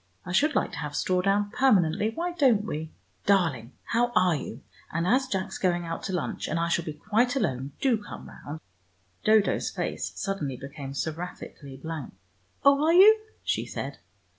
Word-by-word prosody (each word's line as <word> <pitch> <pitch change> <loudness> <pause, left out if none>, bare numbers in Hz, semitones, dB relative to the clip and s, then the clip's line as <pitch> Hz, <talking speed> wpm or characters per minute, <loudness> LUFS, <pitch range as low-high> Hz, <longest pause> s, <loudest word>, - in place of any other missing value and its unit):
I - - -5
should 290 - +3
like - - +1
to - - -6
have 150 -1 -5
straw 185 -1 +1
down 200 +2 +1
permanently, 205 -6 +3
why 340 +10 -3
don't 260 - +3
we? 160 -6 -4 0.4
Darling, 160 - +2
how 240 +1 +1
are 180 -3 +4
you, 140 - -6 0.3
and 165 +2 -1
as 255 +7 +3
Jack's 190 -6 -3
going 175 -2 +1
out 165 0 -4
to - - -3
lunch, 180 -4 -2
and 165 - -1
I 170 0 0
shall 170 0 +1
be 155 - -4
quite 225 - +1
alone, 135 - -1
do 245 -6 +2
come - - -9
round 150 +2 -8 0.4
" 90 -1 -40
Dodo's 215 -1 +3
face - - -3
suddenly 150 -10 -3
became 140 0 -8
seraphically 155 -3 -6
blank. 160 +2 -6 0.5
"Oh, 280 +1 +6
are 325 +2 +4
you?" 400 +5 +9 0.3
she - - -1
said. - - -5
180 Hz, 180 wpm, -27 LUFS, 150-225 Hz, 0.5 s, you